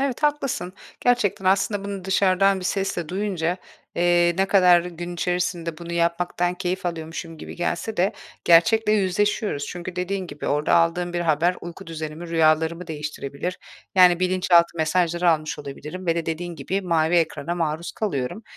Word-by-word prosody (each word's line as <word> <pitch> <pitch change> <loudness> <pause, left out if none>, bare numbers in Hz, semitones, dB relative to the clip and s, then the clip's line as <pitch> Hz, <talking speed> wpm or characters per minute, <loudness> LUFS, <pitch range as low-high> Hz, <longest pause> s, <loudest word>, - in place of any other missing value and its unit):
Evet, 275 0 -2
haklısın. 280 -10 0 0.3
Gerçekten 240 -6 +1
aslında 195 +1 +1
bunu 200 -2 -5
dışarıdan 190 0 +3
bir - - -7
sesle 190 -5 -2
duyunca, 185 -3 -1 0.4
eee, 175 0 +3
ne 195 - +3
kadar 180 -3 +6
gün 175 0 -6
içerisinde 175 -2 -2
bunu 170 0 -7
yapmaktan 175 +1 0
keyif 180 0 -3
alıyormuşum 165 -1 -5
gibi - - -9
gelse 175 +5 -2
de 190 +3 +2 0.3
gerçekle 210 +6 +5
yüzleşiyoruz. 205 -5 0
Çünkü 180 +1 -7
dediğin 185 +1 -2
gibi 150 -3 -7
orada 150 +1 +2
aldığım 175 +1 +2
bir 175 - -1
haber 170 +2 +2
uyku 170 -1 -9
düzenimi, 160 +1 -6
rüyalarımı 160 +1 +2
değiştirebilir. 150 +2 -5 0.4
Yani, 180 -1 +6
bilinçaltı 180 -2 +3
mesajları 170 +2 +2
almış 155 -1 -1
olabilirim 150 +6 -8
ve 165 - +2
de 170 -1 -3
dediğin 170 +1 -4
gibi 190 +8 -2
mavi 165 -2 +1
ekrana 165 0 0
maruz 165 0 -2
kalıyorum. 190 - -3
175 Hz, 150 wpm, -23 LUFS, 165-185 Hz, 0.4 s, kadar